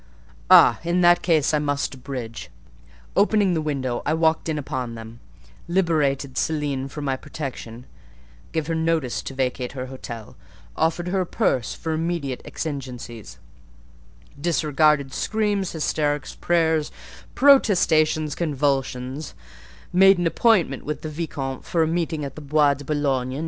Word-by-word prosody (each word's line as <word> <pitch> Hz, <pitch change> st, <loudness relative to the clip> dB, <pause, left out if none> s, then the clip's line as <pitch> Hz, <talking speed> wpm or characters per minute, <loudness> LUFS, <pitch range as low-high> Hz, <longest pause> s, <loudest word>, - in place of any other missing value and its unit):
"Ah! -, -, +7 dB
in 175 Hz, +1 st, +1 dB
that 175 Hz, 0 st, +5 dB
case 160 Hz, -4 st, +2 dB
I 150 Hz, -, +3 dB
must 145 Hz, -1 st, -1 dB
abridge. 125 Hz, -3 st, -7 dB, 0.7 s
Opening 205 Hz, -2 st, +3 dB
the 160 Hz, -, 0 dB
window, 135 Hz, -5 st, -2 dB
I 155 Hz, -, 0 dB
walked 160 Hz, 0 st, +1 dB
in 155 Hz, -, -1 dB
upon 130 Hz, -4 st, -4 dB
them; 115 Hz, +1 st, -10 dB, 0.5 s
liberated 150 Hz, -7 st, 0 dB
Céline 145 Hz, -4 st, -1 dB
from 145 Hz, +1 st, -6 dB
my 135 Hz, -1 st, 0 dB
protection; 130 Hz, -4 st, -7 dB, 0.7 s
gave 160 Hz, -2 st, -1 dB
her 165 Hz, -, -2 dB
notice 160 Hz, -5 st, 0 dB
to 135 Hz, -, -7 dB
vacate 125 Hz, -1 st, -2 dB
her 130 Hz, -2 st, -5 dB
hotel; 120 Hz, -4 st, -9 dB, 0.4 s
offered 165 Hz, +2 st, 0 dB
her 190 Hz, +1 st, +1 dB
a -, -, -1 dB
purse 135 Hz, -, 0 dB
for 160 Hz, -, -4 dB
immediate 160 Hz, -5 st, -2 dB
exigencies; 125 Hz, -, -6 dB, 1.0 s
disregarded 150 Hz, -3 st, +2 dB
screams, 205 Hz, -3 st, -1 dB
hysterics, 150 Hz, -2 st, -1 dB
prayers, 160 Hz, -3 st, +1 dB, 0.4 s
protestations, 160 Hz, -, +4 dB
convulsions; 135 Hz, -2 st, -2 dB, 0.6 s
made 195 Hz, +1 st, +6 dB
an 175 Hz, -, -1 dB
appointment 170 Hz, -, +2 dB
with 150 Hz, -, -5 dB
the 155 Hz, -, -4 dB
vicomte 145 Hz, -4 st, -4 dB
for 165 Hz, -2 st, +1 dB
a -, -, +1 dB
meeting 160 Hz, -2 st, -1 dB
at 140 Hz, -, -6 dB
the 155 Hz, -, -10 dB
Bois 145 Hz, 0 st, +3 dB
de 140 Hz, +1 st, -9 dB
Boulogne. 135 Hz, -3 st, -1 dB
150 Hz, 140 wpm, -23 LUFS, 135-165 Hz, 1.0 s, Ah